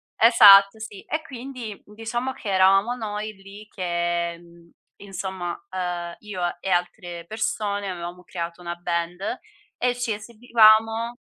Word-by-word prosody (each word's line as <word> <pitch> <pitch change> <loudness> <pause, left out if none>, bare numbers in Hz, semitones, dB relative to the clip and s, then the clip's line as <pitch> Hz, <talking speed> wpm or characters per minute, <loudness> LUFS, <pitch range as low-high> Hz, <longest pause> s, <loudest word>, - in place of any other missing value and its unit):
esatto 210 -3 +8
sì, 215 -2 -8
e 310 - -3
quindi 250 -6 -8
diciamo 225 +5 -4
che 210 - -7
eravamo 195 +5 +4
noi 215 -2 -5
lì 200 +2 -13
che 175 -2 -2
mhmm, 170 -1 -19 0.3
insomma, 190 -2 -5 0.2
uhm, 175 -2 -4
io 205 -4 -7 0.2
e 195 - -4
altre 175 -1 -2
persone 205 0 -2
avevamo 180 0 -7
creato 170 -1 -6
una 170 0 -5
band 175 +2 -3 0.4
e 245 0 +1
ci 245 -3 -2
esibivamo 225 +1 +3
200 Hz, 125 wpm, -24 LUFS, 175-220 Hz, 0.4 s, esatto